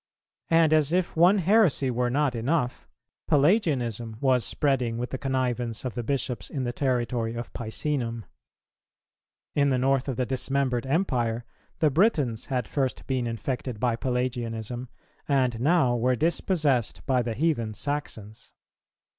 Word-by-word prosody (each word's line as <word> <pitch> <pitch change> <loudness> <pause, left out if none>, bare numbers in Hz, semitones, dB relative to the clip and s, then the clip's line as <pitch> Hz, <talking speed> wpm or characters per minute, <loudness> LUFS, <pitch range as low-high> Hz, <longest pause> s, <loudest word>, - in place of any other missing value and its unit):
And 165 -1 +4
as 155 -1 +3
if 180 0 0
one 175 +5 +5
heresy 180 - +3
were 125 0 0
not 140 +1 +1
enough, 125 +3 -1 0.4
Pelagianism 135 - +1
was 130 -3 +2
spreading 130 -6 0
with 125 +1 -4
the 130 - -4
connivance 125 -3 -2
of 125 - -3
the 120 - -3
Bishops 120 -4 -3
in 135 - -3
the 120 -1 -2
territory 120 -3 -1
of 120 +1 -6
Picenum. 115 -1 -3 1.3
In 140 -1 +3
the 130 - +2
North 135 +1 +1
of 135 - -2
the 125 - +1
dismembered 130 -1 -1
Empire, 120 -8 0 0.3
the 155 -2 +3
Britons 145 - +1
had 125 -4 -1
first 135 -3 -2
been 130 -3 -1
infected 120 0 -4
by 120 -1 +1
Pelagianism, 120 -1 -3 0.4
and 130 -5 +1
now 140 -2 +3
were 125 +2 +2
dispossessed 155 - 0
by 130 -2 +2
the 115 -2 -3
heathen 120 -8 0
Saxons. 115 -7 -5
130 Hz, 140 wpm, -26 LUFS, 120-145 Hz, 1.3 s, one